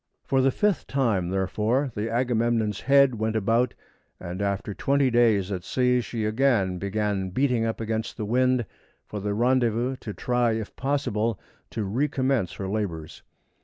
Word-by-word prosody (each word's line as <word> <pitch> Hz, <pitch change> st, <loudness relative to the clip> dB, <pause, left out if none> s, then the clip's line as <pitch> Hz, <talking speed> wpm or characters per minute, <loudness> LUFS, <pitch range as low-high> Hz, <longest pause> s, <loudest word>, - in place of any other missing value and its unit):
For 135 Hz, -1 st, +2 dB
the 135 Hz, -, +4 dB
fifth 205 Hz, +7 st, 0 dB
time, 110 Hz, -10 st, 0 dB
therefore, 105 Hz, +8 st, 0 dB
the 105 Hz, +2 st, -3 dB
Agamemnon's 115 Hz, -3 st, 0 dB
head 140 Hz, -1 st, +5 dB
went 110 Hz, 0 st, -1 dB
about, 115 Hz, +3 st, +1 dB, 0.4 s
and 90 Hz, +3 st, -6 dB
after 100 Hz, 0 st, -2 dB
twenty 140 Hz, +3 st, +1 dB
days 110 Hz, -5 st, +3 dB
at 90 Hz, -2 st, -3 dB
sea 125 Hz, +2 st, +2 dB
she 115 Hz, -2 st, -4 dB
again 110 Hz, -6 st, +1 dB
began 100 Hz, -1 st, -1 dB
beating 125 Hz, +2 st, +1 dB
up 115 Hz, -, -2 dB
against 110 Hz, 0 st, -3 dB
the 110 Hz, -, -3 dB
wind 125 Hz, +2 st, +2 dB, 0.4 s
for 105 Hz, -, -6 dB
the 100 Hz, +1 st, -2 dB
rendezvous 120 Hz, +1 st, +1 dB
to 110 Hz, -, -7 dB
try, 120 Hz, +1 st, 0 dB
if 110 Hz, -2 st, -5 dB
possible, 120 Hz, -6 st, -1 dB, 0.3 s
to 110 Hz, -, -3 dB
recommence 130 Hz, 0 st, 0 dB
her 95 Hz, -, -5 dB
labors. 95 Hz, -7 st, -4 dB
115 Hz, 155 wpm, -25 LUFS, 105-125 Hz, 0.4 s, head